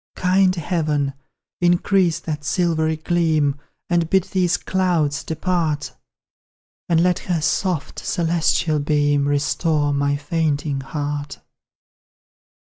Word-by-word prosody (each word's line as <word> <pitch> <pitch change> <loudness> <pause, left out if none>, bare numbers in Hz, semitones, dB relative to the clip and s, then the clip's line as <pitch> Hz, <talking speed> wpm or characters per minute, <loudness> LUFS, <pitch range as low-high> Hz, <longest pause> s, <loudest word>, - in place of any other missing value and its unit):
Kind 185 0 +3
Heaven! 150 -5 -1 0.5
increase 175 -1 +2
that 150 -3 -4
silvery 160 0 +1
gleam 155 -3 +1 0.3
And 170 -2 +1
bid 190 0 +3
these 180 -2 0
clouds 170 -6 0
depart, 160 -2 -2 1.0
And 165 -1 +3
let 180 -1 +2
her 175 -2 +1
soft 160 +1 -1
celestial 165 -2 0
beam 145 -1 +1
Restore 145 +1 +1
my 140 0 +1
fainting 145 -2 -1
heart! 145 +1 -4
160 Hz, 100 wpm, -21 LUFS, 145-175 Hz, 1.0 s, Kind